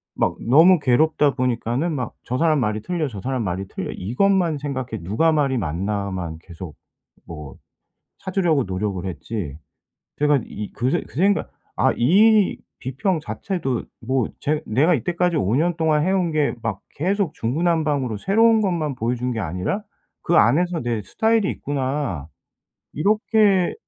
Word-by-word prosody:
막 - - 0
너무 165 +7 +7
괴롭다 145 +2 +2
보니까는 125 +5 -1
막 125 -6 -3
'저 125 - -3
사람 155 -2 +3
말이 110 -3 -1
틀려, 170 +3 -2
저 105 -7 -7
사람 130 0 -2
말이 95 0 -3
틀려.' - - -5
이것만 170 - +1
생각해 130 - -4
누가 110 - +2
말이 140 -4 +1
맞나만 95 -2 -3
계속 85 -3 -10 0.5
뭐 75 -4 -9 0.7
찾으려고 175 -7 +1
노력을 95 -1 -3
했지 85 - -5 0.6
제가 145 -1 +3
이 105 -1 -6
그 125 +2 -1
새 - - 0
그 - - -19
생각 195 +5 +2 0.3
아 - - +3
이 205 - +4 0.2
비평 135 +8 -1
자체도 150 - -3 0.2
뭐 130 0 0
제 150 +1 -1
'내가 145 +11 +3
이때까지 175 +5 0
5 110 -6 +1
년 170 +3 +1
동안 155 -2 +2
해 190 - +2
온 185 -3 +1
게 150 -3 +1
막 110 -4 -3 0.2
계속 190 +1 0
중구난방으로 145 -2 0
새로운 225 - +4
것만 170 -7 -1
보여준 125 +1 -1
게 115 - -3
아니라 90 - -2 0.4
그 170 - 0
안에서 175 +2 +3
내 120 -3 -2 0.4
스타일이 195 - 0
있구나.' 135 - -3 0.7
이렇게 205 - +2
140 Hz, 290 characters per minute, -22 LUFS, 110-170 Hz, 0.7 s, 너무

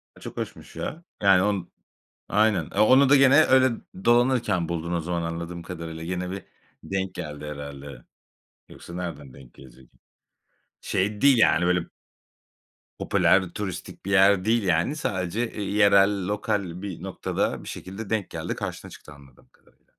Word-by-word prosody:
A, - - -17
çok - - -9
hoşmuş - - -7
ya. 170 - -5 0.2
Yani 95 -2 +6
on 100 -4 -1 0.6
Aynen. 105 -4 +3
Eee, - - -2
onu 130 +5 +6
da 145 - +7
gene 135 0 +6
öyle 130 0 +5 0.4
dolanırken 120 -8 +2
buldun 85 0 -3
o 85 - 0
zaman 85 +1 -2
anladığım 85 +1 -5
kadarıyla. 80 -2 -7
Yine 90 +1 -3
bir 95 0 -6 0.4
denk 95 -1 -3
geldi 75 -1 -6
herhâlde. 70 -3 -8 0.6
Yoksa 85 - -12
nereden 75 -7 -6
denk 65 -3 -15
gelecek? 65 -1 -17 0.9
Şey 100 +2 -1
değil 140 -2 +5
yani 90 -5 +4
öyle 90 -1 +1 1.1
Popüler 95 -2 +3
turistik 95 -4 -6
bir 100 - -3
yer 100 -1 +5
değil 115 0 +2
yani. 90 - +1
Sadece, 105 - -2
eee, 105 - -6
yerel 100 -1 +3
lokal 100 -4 -2
bir 100 -4 -7
noktada - - -2
bir - - -12
şekilde 95 +3 -8
denk 110 -4 -1
geldi - - -4
karşına - - -6
çıktı 75 - -13
anladığım 70 -3 -19
kadarıyla. - - -30
95 Hz, 155 wpm, -25 LUFS, 85-105 Hz, 1.1 s, da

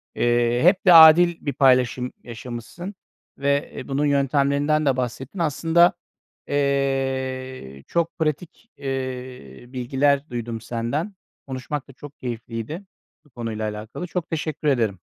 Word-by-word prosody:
Eee, 120 0 +2
hep 185 +3 +4
de 180 - +8
adil 165 +1 +8
bir 140 - -1
paylaşım 125 -2 +3
yaşamışsın 125 - -8 0.4
ve, 140 0 0
eee, - - -7
bunun 140 +2 0
yöntemlerinden 140 +2 +2
de 135 -2 +2
bahsettin. 130 - -4
Aslında, 165 +2 +3 0.5
eee, 130 - -2
çok 170 0 -1
pratik, 160 +8 -3
eee, 130 - -6
bilgiler 135 +3 0
duydum 115 -2 -5
senden. 125 - -3 0.3
Konuşmak 130 +2 -5
da 135 - -14
çok 145 +2 -12
keyifliydi 120 - -5 0.4
bu - - -23
konuyla 115 -4 -4
alakalı. 110 +11 -7
Çok 175 -1 -4
teşekkür 155 -2 -3
ederim. 115 -9 +1
135 Hz, 125 wpm, -23 LUFS, 120-150 Hz, 0.5 s, de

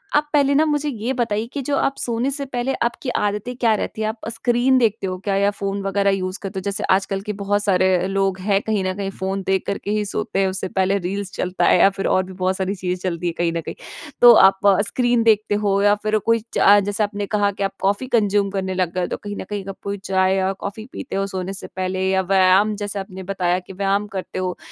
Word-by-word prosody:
आप 295 0 +2
पहले 280 -1 +3
ना 310 +2 +4
मुझे 295 -1 0
ये 240 0 -3
बताइए 230 -4 -1
कि 285 - -3
जो 285 - +1
आप 275 - 0
सोने 240 +3 -1
से 280 0 -3
पहले 260 0 -2
आपकी 240 +3 -2
आदतें 210 +2 -2
क्या 230 -3 +3
रहती 215 - -4
हैं? 215 - 0
आप 220 0 -6
स्क्रीन 240 +3 +2
देखते 225 -5 +1
हो 185 0 -3
क्या? 195 +1 -2
या 200 +1 +2
फ़ोन 200 0 -3
वगैरह 200 0 +1
यूज़ 185 0 -2
करते 195 0 -4
हो? - - -7
जैसे 200 +2 -3
आजकल 195 0 +1
के 210 +1 -4
बहुत 205 +1 -1
सारे 185 -2 +2
लोग 195 -1 0
हैं 200 0 +1
कहीं 215 -3 -1
न 185 0 -1
कहीं 195 -1 -3
फ़ोन 190 +1 -2
देख 190 0 +1
करके 200 0 -3
ही 210 0 0
सोते 205 -1 -3
हैं, 195 - +3
उससे 190 0 -3
पहले 190 +1 +1
रील्स 195 +1 -4
चलता 180 -1 -1
है - - +5
या 195 - +7
फिर 195 0 -3
और 185 - +2
भी 185 +1 -10
बहुत 185 0 -1
सारी 190 +1 -2
चीज़ें 180 0 -2
चलती 175 0 -3
है 170 - -1
कहीं 170 -1 +1
न - - -2
कहीं। - - -7 0.5
तो 240 -1 +10
आप 195 -2 +5
अ, 195 -2 +5
स्क्रीन 240 -1 +1
देखते 215 -2 +3
हो 200 0 +2
या 205 0 +5
फिर 215 0 +2
कोई 230 0 +3
चा 205 +1 +6
जैसे 205 +1 0
आपने 205 0 -3
कहा 205 -1 +2
कि - - 0
आप 195 0 -1
कॉफ़ी 200 +6 0
कन्ज्यूम 205 -2 +1
करने 190 -1 -2
लग 180 -2 -1
गए 185 - -1
हो। 175 - -1
तो - - -4
कहीं 205 0 -7
न - - -5
कहीं 205 -1 -3
आप 195 - -7
कोई 200 0 -3
चाय 190 0 +2
या 190 0 +1
कॉफ़ी 200 +3 -7
पीते 270 - -6
हो 195 0 0
सोने 190 -1 -4
से 195 - -7
पहले? 185 0 -1
या 190 0 +2
व्यायाम 190 +2 +3
जैसे 205 0 -4
आपने 190 -1 -7
बताया 180 -1 +1
कि 185 +1 -12
व्यायाम 200 +2 0
करते 190 -2 -5
हो 185 -1 -3
200 Hz, 255 wpm, -21 LUFS, 190-215 Hz, 0.5 s, तो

